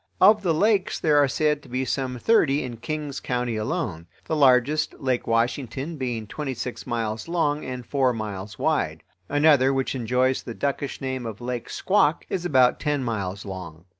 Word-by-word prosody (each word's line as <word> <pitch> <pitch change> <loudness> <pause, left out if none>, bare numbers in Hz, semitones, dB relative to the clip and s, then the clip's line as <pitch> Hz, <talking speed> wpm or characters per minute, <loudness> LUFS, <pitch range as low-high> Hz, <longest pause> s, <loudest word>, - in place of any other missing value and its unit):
Of 210 +2 +6
the 180 -4 +1
lakes 200 +2 +2
there 150 -2 +4
are 145 - +5
said 150 +2 +1
to - - -16
be 130 +2 -1
some 130 0 -2
thirty 150 - +3
in 120 -2 -6
King's 145 +3 -4
County 125 -2 -2
alone; 110 - -3 0.2
the 160 - -1
largest, 140 +1 +3
Lake 130 -2 -1
Washington, 125 +6 -1
being 120 -5 -3
twenty 135 +4 -4
six 120 +2 -6
miles 110 -2 -2
long 155 -3 0
and 125 -1 -6
four 135 -1 +2
miles 105 -3 -5
wide. - - 0 0.3
Another, 145 -3 +4
which 135 -1 -1
enjoys 125 +1 +1
the 115 - -7
duckish 140 0 -2
name 130 -2 -3
of 110 -2 -7
Lake 120 -1 -4
Squak, 180 -5 +2
is 180 -2 -2
about 130 -6 +4
ten 145 -3 0
miles 100 -5 -3
long. 90 -4 -8
130 Hz, 175 wpm, -25 LUFS, 115-150 Hz, 0.3 s, Of